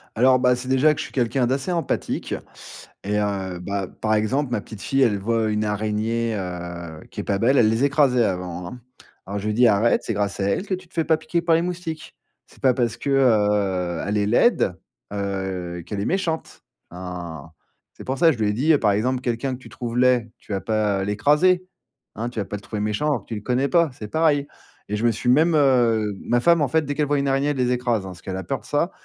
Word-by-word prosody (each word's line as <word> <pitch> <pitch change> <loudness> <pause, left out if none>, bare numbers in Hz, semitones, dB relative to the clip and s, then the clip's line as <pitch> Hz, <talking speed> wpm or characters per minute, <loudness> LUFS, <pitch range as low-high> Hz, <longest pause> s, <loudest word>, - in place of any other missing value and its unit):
Alors, 130 +3 +5
bah, 125 0 +4
c'est 125 +1 -7
déjà 130 +4 +4
que - - -7
je - - -3
suis - - -11
quelqu'un 125 0 +1
d'assez 135 +7 -1
empathique 170 -2 -2 0.7
et 105 +1 -1
heu, 95 -3 -2
bah, 100 +1 -3
par 110 0 +1
exemple, 125 +6 0
ma 110 - 0
petite 105 -1 -11
fille, 135 0 +1
elle 115 -6 +3
voit 110 +2 0
une 105 0 0
araignée, 110 +2 -1
heu, 85 -4 -6
qui - - -7
est - - -7
pas 100 - -1
belle, 130 +6 +3
elle 115 - +5
les 115 +4 +1
écrasait 140 -4 +3
avant, 90 -3 -3
hein. 125 +6 -9 0.4
Alors 100 +1 -4
je 105 - -4
lui 105 - 0
dis: 125 0 +5
«Arrête, 110 +2 +3
c'est 115 - -2
grâce 100 -1 -2
à 95 - 0
elle 100 - -1
que 195 - -2
tu 185 -1 -13
te - - -29
fais 165 -2 0
pas 160 - +3
piquer 170 +2 -2
par 170 -1 +3
les 165 - +2
moustiques. 175 -3 -5 0.3
C'est - - -21
pas 130 -1 +4
parce, 120 -3 0
heu, 105 -9 +2
elle 105 +1 0
est 105 - +1
laide, 110 - +3 0.4
heu, 95 -3 -3
qu'elle 100 -2 -4
est - - -2
méchante». 175 -4 -2 0.3
Hein, 90 -3 -7 0.4
c'est - - -11
pour 130 +1 -3
ça 165 -1 +6
je 125 - -4
lui 105 -2 +1
ai - - 0
dit, 145 +7 +3
par 105 -5 +2
exemple,: 125 +5 0
«Quelqu'un 125 +2 -2
que - - -13
tu - - -13
trouves 120 -1 -5
laid, 125 -3 +3
tu - - -13
vas 95 - -1
pas 105 -3 0
l'écraser, 150 - +3 0.5
hein? 115 +2 -3
Tu 120 - -14
vas 100 - -1
pas 105 - -5
le - - -12
trouver 105 0 -5
méchant 105 +8 -1
alors 130 -8 0
que - - -29
tu 115 - -4
le 105 - -5
connais 125 +5 0
pas, 170 -2 +3
c'est 105 - -8
pareil» 150 -3 +2 0.4
et 105 - -1
je 115 - -1
me 120 - +4
suis 115 +3 -2
même, 155 +6 +4
heu 120 -7 +3
ma 120 0 +1
femme, 170 +4 +4
en 145 - +2
fait, 160 +3 +1
dès 145 - -2
qu'elle 150 0 +1
voit 145 +1 +1
une 140 0 0
araignée, 135 +1 +1
elle 145 - -2
les 125 -1 +1
écrase, 120 -5 0
hein, - - -6
parce 90 - -11
qu'elle 95 - -5
a 95 - -5
peur 135 - -3
de - - -20
ça, 155 +5 0
115 Hz, 250 wpm, -23 LUFS, 100-135 Hz, 0.7 s, ça